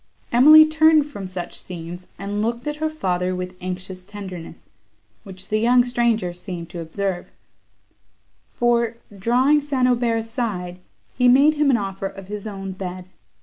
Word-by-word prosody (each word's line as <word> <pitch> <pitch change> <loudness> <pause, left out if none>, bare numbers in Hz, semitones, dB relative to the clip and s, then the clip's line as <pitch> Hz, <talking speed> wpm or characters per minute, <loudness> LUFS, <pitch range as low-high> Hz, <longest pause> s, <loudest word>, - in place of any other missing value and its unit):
Emily 305 +6 +9
turned 315 -1 +4
from 205 -10 -7
such 180 -1 -6
scenes, 175 0 -8
and 205 +1 -3
looked 235 +3 -2
at 295 0 -3
her 315 +1 -1
father 185 -11 -1
with 180 0 -5
anxious 185 0 -6
tenderness, 185 -4 -9 0.5
which 185 - -9
the 215 - +1
young 245 +2 +4
stranger 235 -7 0
seemed 175 -2 -7
to 175 - -6
observe; 175 +2 -4 1.2
for, 235 -1 +1 0.2
drawing 255 +9 +3
St. 275 -3 +1
Aubert 240 -2 +1
aside, 215 -6 -4 0.3
he 250 -1 +3
made 280 +5 +6
him 295 -1 +2
an 255 - +4
offer 195 -2 -4
of 195 0 -11
his 210 0 -6
own 195 -2 -6
bed. 185 -1 -7
205 Hz, 150 wpm, -22 LUFS, 185-245 Hz, 1.2 s, Emily